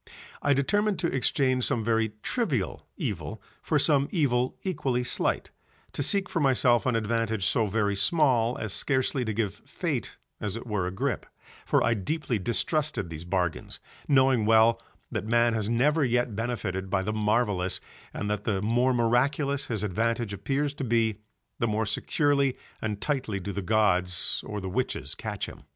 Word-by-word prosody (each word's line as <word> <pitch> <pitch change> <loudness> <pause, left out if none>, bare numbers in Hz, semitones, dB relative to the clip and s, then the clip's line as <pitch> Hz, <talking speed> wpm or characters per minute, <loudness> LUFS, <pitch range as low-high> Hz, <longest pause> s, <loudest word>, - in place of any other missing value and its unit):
I 145 -1 +3
determined 205 +9 +1
to 170 - -1
exchange 130 -1 +1
some 115 - 0
very 110 -1 +1
trivial 145 - -1
evil - - -4 0.2
for - - +1
some 140 -2 +3
evil 130 -7 +1
equally 135 -9 -1
slight, 120 - 0 0.4
to - - -3
seek 195 +6 +1
for 170 - -2
myself 130 -3 +3
an 125 - +2
advantage 110 -2 0
so 110 +2 +2
very 105 0 0
small 120 - +2
as 105 -3 -3
scarcely 130 +1 +1
to 110 - -2
give 105 -2 -1
Fate - - -4 0.2
as 105 +1 -3
it 115 - -8
were 105 -6 -1
a - - -3
grip, 95 - -2 0.4
for - - +3
I 120 - +3
deeply 120 - -2
distrusted 120 - -1
these 80 +1 -7
bargains, 90 -2 -2 0.3
knowing 130 -5 +4
well 115 +1 +5 0.3
that 110 -3 -3
man 120 +1 +3
has 110 -1 -1
never 145 +7 +3
yet 120 -3 +1
benefited 105 -5 -3
by 95 0 +1
the 105 +2 -2
marvellous 105 -4 +1 0.3
and 105 - -4
that 105 -1 -2
the 105 -3 0
more 120 +5 +2
miraculous 140 +4 +1
his 110 -4 -2
advantage 115 +2 -1
appears 135 +9 -1
to 145 - -5
be 115 -3 +1 0.4
the 115 - +1
more 110 +1 0
securely 140 +4 +1 0.2
and 105 -2 -2
tightly 130 -9 -1
do 100 +2 -5
the 100 - -3
gods 90 -4 +2
or 105 - -4
the 95 - -5
witches 125 +8 -1
catch - - -4
him. - - -11
115 Hz, 170 wpm, -27 LUFS, 105-135 Hz, 0.4 s, well